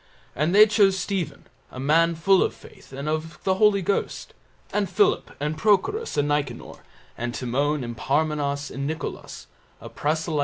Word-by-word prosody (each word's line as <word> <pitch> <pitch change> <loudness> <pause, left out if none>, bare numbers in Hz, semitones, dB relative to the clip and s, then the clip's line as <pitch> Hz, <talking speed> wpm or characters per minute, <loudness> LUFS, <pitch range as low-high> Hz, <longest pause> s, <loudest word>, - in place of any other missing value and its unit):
And 155 +6 +1
they 210 +1 +9
chose 200 -3 +3
Stephen, 190 -2 -3 0.2
a 130 - -10
man 165 +5 +3
full 190 +4 +3
of - - 0
faith - - -17
and 140 +2 -6
of 155 0 -3
the 190 - +2
Holy 205 -2 +4
Ghost, 200 +3 -2 0.4
and 205 -2 0
Philip 405 -1 +2
and 150 +2 -2
Prochorus 220 - +1
and 145 0 +2
Nicanor, 145 -4 -3 0.4
and 120 0 -3
Timon 140 +3 -1
and 120 -1 -6
Parmenas 145 +2 -1
and 140 +1 -4
Nicolas, 160 +1 -6 0.3
a - - -10
proselyte 155 +3 -2
of - - 0
Antioch. - - +1
155 Hz, 175 wpm, -24 LUFS, 145-195 Hz, 0.4 s, they